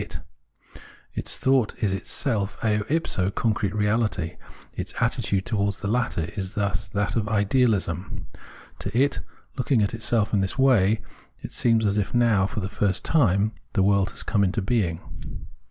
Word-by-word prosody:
Its - - -2
thought 130 -4 +2
is 105 -4 0
itself 100 0 -1
eo 105 -1 +2
ipso 140 - 0
concrete 105 -1 0
reahty; 105 -5 0 0.4
its - - -5
attitude 95 -1 0
towards 100 -3 -1
the 100 - -2
latter 110 -7 -1
is 95 0 -4
thus 100 -5 -1
that 100 +1 -1
of 110 -2 0
Idealism. 105 -4 +1 0.5
To_it, 125 +7 +1 0.4
looking 125 -3 +2
at 100 - -1
itself 110 -2 +1
ia 100 - +3
this 95 +5 -1
way, 115 -6 +4 0.4
it - - -6
seems 115 -2 +2
as 105 0 +2
if 100 - -2
how, 115 -5 +3
for 105 - -4
the.. 95 - -2
first 100 -1 -1
time, 105 - +3 0.2
the 100 - +3
world 100 0 +3
had - - -6
come 105 -2 +2
into 95 +3 +1
being. 95 -6 0
105 Hz, 155 wpm, -25 LUFS, 95-115 Hz, 0.5 s, way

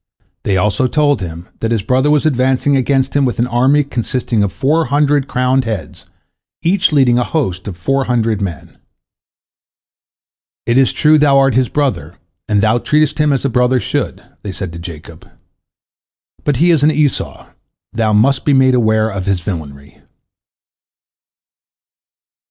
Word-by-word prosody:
They 95 - +1
also 105 +7 +1
told 145 -4 +1
him 85 -1 -7
that 115 - -2
his 115 -4 -1
brother 130 +6 +1
was 150 0 +2
advancing 130 0 +1
against 135 0 0
him 145 - +3
with 125 -4 -1
an 120 - +1
army 130 +5 +2
consisting 125 -3 -2
of 100 -2 0
four 155 - 0
hundred 145 +1 +1
crowned 130 +1 0
heads, 110 -4 -6 0.6
each 180 +2 +2
leading 130 -5 +3
a - - +1
host 95 - -3
of 95 -4 -6
four 135 +10 -1
hundred 115 -4 0
men. 90 -6 -7 1.9
"It 120 +3 +2
is 135 - +3
true, 155 0 +3
thou 145 -2 +4
art 135 -1 +3
his 130 0 +1
brother, 145 -3 -2 0.3
and 105 -2 +2
thou 110 +3 +2
treatest 150 +2 0
him 150 -1 +2
as 135 0 -1
a - - +3
brother 125 +1 +1
should," - - -3 0.2
they 100 - -6
said 95 -3 -6
to 85 - -8
Jacob, 85 -1 -11 1.1
"but 145 - 0
he 175 +5 +3
is 160 -4 +2
an 150 - +5
Esau, 150 -3 -2 0.5
thou 110 -1 0
must 125 +6 +2
be 145 - +2
made 130 -1 +4
aware 110 -3 +2
of 95 -1 -5
his 95 -3 0
villainy." 75 -7 -8
125 Hz, 160 wpm, -15 LUFS, 105-140 Hz, 1.9 s, an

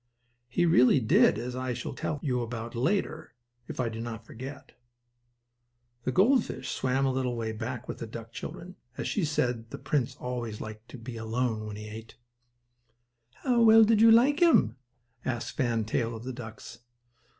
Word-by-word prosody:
He 175 +8 +2
really 135 -4 +5
did, 110 -2 +4
as 125 +2 -4
I 130 0 -2
shall 125 - -5
tell 150 - -3
you 125 -4 0
about 115 0 -5
later, 160 - -1 0.3
if - - -7
I 125 - +1
do 115 0 -5
not 115 -1 -6
forget 135 +5 -8
it. - - -23 1.3
The 130 - +1
gold 225 - +4
fish - - -6
swam 135 +1 0
a 135 - +2
little 130 -2 -1
way 115 -1 -2
back 115 +3 -5
with - - -6
the 115 - -5
duck 115 0 -8
children, 175 +9 -8 0.2
as - - -3
she 205 - 0
said 125 -7 -1
the - - -6
prince 140 -5 -1
always 120 -4 -4
liked 110 +1 -8
to - - -9
be 115 0 -8
alone 115 -1 -2
when 105 - -6
he 105 +1 -8
ate. 110 +1 -9 1.3
"Well, 245 -3 +4
how 225 0 +9
did 220 0 +4
you 225 - +8
like 260 +8 +5
him?" 220 - +5 0.5
asked 120 -2 -3
Fan 115 -4 0
Tail 115 +1 -1
of 110 - -8
the 130 +1 -5
ducks. 115 -1 -9
125 Hz, 185 wpm, -29 LUFS, 115-140 Hz, 1.3 s, how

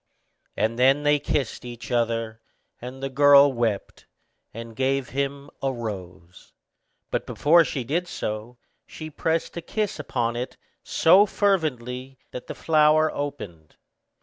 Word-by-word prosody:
And 110 +3 0
then 135 +3 +4
they 145 0 +3
kissed 140 -3 -2
each 120 0 -9
other, 115 -2 -1 0.4
and 130 +2 -8
the 135 - -2
girl 140 0 +6
wept, 115 -4 -3 0.4
and 115 0 -9
gave 135 +1 0
him 140 +1 -3
a 135 - 0
rose; 95 -7 -8 0.6
but - - -2
before 165 +3 +4
she 135 -5 -3
did 165 +9 -2
so, 110 -3 -5 0.3
she 155 0 -9
pressed 160 +2 -1
a - - -3
kiss 210 -1 -3
upon 120 -5 -2
it 125 +2 -5 0.3
so 190 +6 +5
fervently 135 - -1
that 125 - -8
the - - -6
flower 155 0 +3
opened. 105 - -6
135 Hz, 135 wpm, -24 LUFS, 115-150 Hz, 0.6 s, girl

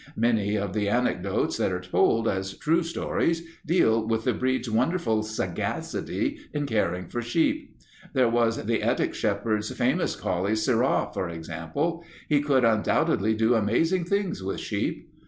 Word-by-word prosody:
Many 110 -3 +2
of 100 -2 -2
the 105 -1 0
anecdotes 125 +3 0
that - - +1
are 90 - -1
told 110 +5 +2
as 95 0 -2
true 165 +3 +2
stories 165 0 -1 0.2
deal 115 -10 +3
with 115 0 0
the 125 - +1
breed's 130 +2 -1
wonderful 115 0 +1
sagacity 110 -5 -3
in 145 -1 -1
caring 90 -7 -1
for 120 - -3
sheep. 170 - 0 0.4
There 130 -2 +4
was 115 -1 +1
the 115 +1 +1
Ettrick 115 +3 +1
Shepherd's 105 0 -1
famous 130 +8 0
collie 95 +4 -1
Sirrah, 120 +4 +1
for 95 - -2
example. 85 - -3 0.2
He 145 -2 +3
could 135 -4 +3
undoubtedly 110 -1 +2
do 110 +2 +3
amazing 160 - +2
things 200 - -1
with 95 +1 -3
sheep. - - -3
115 Hz, 150 wpm, -26 LUFS, 105-140 Hz, 0.4 s, There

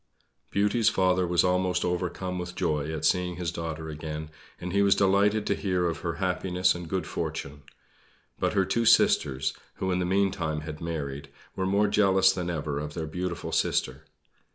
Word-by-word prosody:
Beauty's 105 +3 +2
father 95 -1 +2
was 85 0 +3
almost 90 0 +1
overcome 90 +1 -2
with 90 0 -6
joy 75 -2 -1
at 80 - -3
seeing 90 -1 +1
his 85 -1 -3
daughter 80 -2 -5
again, 75 0 -6 0.3
and 90 +1 -5
he 100 - +3
was 100 -1 +5
delighted 100 +2 +3
to - - +2
hear 90 -3 0
of 85 - -3
her 85 - -2
happiness 90 0 +1
and 85 -2 -7
good 95 -3 -1
fortune. 70 -1 -5 0.8
But - - 0
her 95 - +2
two 115 +5 0
sisters 70 -10 +3 0.2
who 95 - -2
in 90 - +1
the 90 - 0
meantime 90 -5 0
had 75 0 -7
married 75 -4 -4 0.3
were 95 - -1
more 100 +2 +3
jealous 95 -2 +4
than 90 -2 -3
ever 75 -3 -2
of 75 0 -6
their 80 - -3
beautiful 90 +2 -4
sister. - - 0
90 Hz, 175 wpm, -27 LUFS, 80-95 Hz, 0.8 s, was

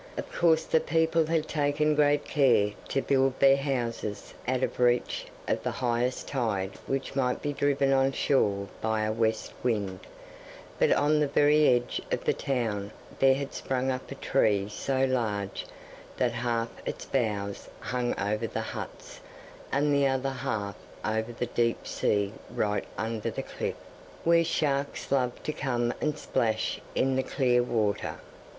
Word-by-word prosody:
Of - - -5
course 160 -2 +4
the 160 - +3
people 160 0 +2
had 160 -1 +1
taken 150 0 +1
great 145 -1 +3
care 125 -8 +3 0.2
to 135 - 0
build 135 -1 +2
their 135 0 +7
houses 120 -6 -3
out 130 0 +1
of - - -2
reach 125 0 +2 0.2
of - - 0
the - - -1
highest 125 +1 -1
tide 105 -8 -1 0.2
which 135 0 -2
might 125 -2 +1
be 145 -1 -1
driven 140 -1 +2
on 135 0 +3
shore 100 -8 +1
by 110 -1 0
a 110 - 0
west 110 0 0
wind, 100 -6 -1 0.8
but - - +4
on 150 +1 +3
the 150 - +2
very 150 +2 +4
edge 120 -1 +2
of - - -1
the - - +3
town 110 -7 -2 0.3
there 135 0 +6
had 140 0 -4
sprung 130 0 -1
up 130 0 -5
a 140 - -6
tree 105 -7 +2
so 130 +5 0
large 105 -6 -1 0.5
that 125 -2 +2
half 115 0 -1
its - - -5
boughs 105 -6 -2
hung 125 -1 -2
over 105 +3 0
the - - -4
huts - - -7 0.5
and 145 +1 +2
the 140 -1 +4
other 135 0 0
half 120 -7 -3 0.3
over 110 +2 -1
the 120 +1 -3
deep 115 -1 0
sea 100 -1 0 0.2
right 105 -1 -1
under 110 -1 -2
the - - -4
cliff, - - -4 0.5
where 170 0 +5
sharks 140 -3 -1
loved 125 -3 0
to 155 - -2
come 120 -4 0
and 150 0 0
splash 110 -6 -1
in 135 0 +2
the 130 - +2
clear 125 -2 +2
water. 110 -4 0
125 Hz, 160 wpm, -28 LUFS, 110-140 Hz, 0.8 s, their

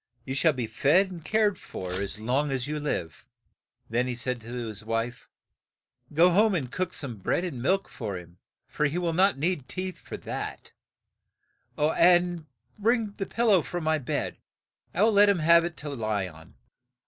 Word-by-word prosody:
You 130 - -3
shall 155 +3 +3
be 125 -3 -2
fed 175 - +3
and 170 -3 -8
cared 210 +2 +2
for 95 - -6
as 100 +1 -4
long 130 +7 0
as 130 -2 -1
you 150 +1 -3
live." 90 - -4 0.6
Then 120 +2 0
he 125 - -2
said 125 0 -2
to 110 - -12
his 115 -4 -5
wife, 115 +2 -3 0.8
"Go 170 +4 +5
home 210 +2 +4
and 130 -7 -2
cook 185 +3 -2
some 125 -10 -6
bread 100 - 0
and 160 -10 -4
milk 190 +9 +1
for 105 -6 -5
him, 85 0 -13 0.3
for 150 - 0
he 150 +4 -3
will 175 -2 0
not 190 0 +3
need 150 -3 -1
teeth 185 0 -4
for - - -8
that, - - -6 1.1
and 175 +2 +3 0.3
bring 225 0 +2
the 195 -1 -5
pil 235 0 +1
low 190 -4 +6
from 175 +2 -5
my 155 0 +2
bed, 125 - -3 0.5
I 195 - +1
will 225 - +5
let 205 0 +6
him 200 - +3
have 170 +1 +5
it 170 -1 -5
to 150 - -5
lie 110 -7 -1
on. 80 -2 -14
150 Hz, 185 wpm, -27 LUFS, 120-180 Hz, 1.1 s, low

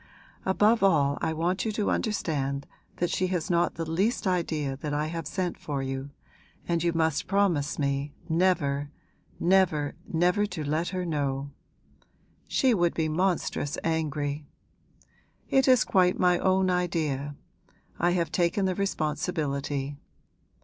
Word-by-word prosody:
Above 210 +4 +4
all 145 -7 +3
I - - 0
want 170 +4 0
you 220 - -1
to 210 -1 0
understand 140 -9 -1 0.3
that 175 0 -1
she 185 - +1
has 180 -2 -2
not 170 0 +2
the 165 0 -4
least 195 +9 0
idea 160 -7 0
that 145 +1 -3
I 150 +1 0
have 165 -1 -4
sent 180 0 -2
for 140 -3 -3
you, 135 +1 -4 0.6
and 170 -1 0
you 170 - +2
must 160 -2 0
promise 185 -7 +1
me 140 0 -1 0.2
never, 160 -5 +1 0.5
never, 170 -5 +3 0.2
never 180 +5 +2
to 180 -6 -5
let 155 +4 0
her 185 -1 -2
know. 140 -3 -2 1.0
She 260 -2 +3
would 175 -5 +2
be 160 -1 0
monstrous 170 -3 0
angry. 150 -2 -1 1.0
It 265 0 +3
is 255 -2 +6
quite 180 -1 +3
my 180 -1 +4
own 190 0 +2
idea 155 -6 -1 0.6
I 175 +1 +3
have 170 -3 -1
taken 180 +3 +1
the 185 - +1
responsibility. 150 -6 -2
165 Hz, 140 wpm, -27 LUFS, 145-185 Hz, 1.0 s, is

